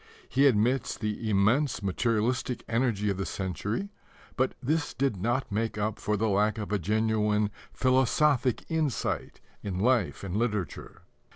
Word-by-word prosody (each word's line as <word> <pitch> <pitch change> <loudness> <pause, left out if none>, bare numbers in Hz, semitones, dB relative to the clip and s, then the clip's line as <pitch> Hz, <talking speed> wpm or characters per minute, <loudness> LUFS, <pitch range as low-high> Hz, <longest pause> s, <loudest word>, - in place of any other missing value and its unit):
He 140 +2 +4
admits 120 +1 +2
the 110 0 -3
immense 110 +5 +2
materialistic 115 +5 0
energy 115 -3 +1
of 95 - -3
the 95 - -2
century, 100 - -3 0.5
but 130 0 0
this 150 +4 -1
did 135 -4 +1
not 120 +7 -1
make 110 +1 -1
up 105 0 -2
for 105 0 0
the 110 +2 +1
lack 105 +1 +2
of 105 -2 -5
a 105 - +1
genuine 105 +1 +1 0.2
philosophic 130 0 +2
insight 160 -5 -2 0.2
in 95 -3 -4
life 120 +1 +1
and 95 -1 -4
literature. 105 -5 -3
110 Hz, 145 wpm, -28 LUFS, 105-130 Hz, 0.5 s, He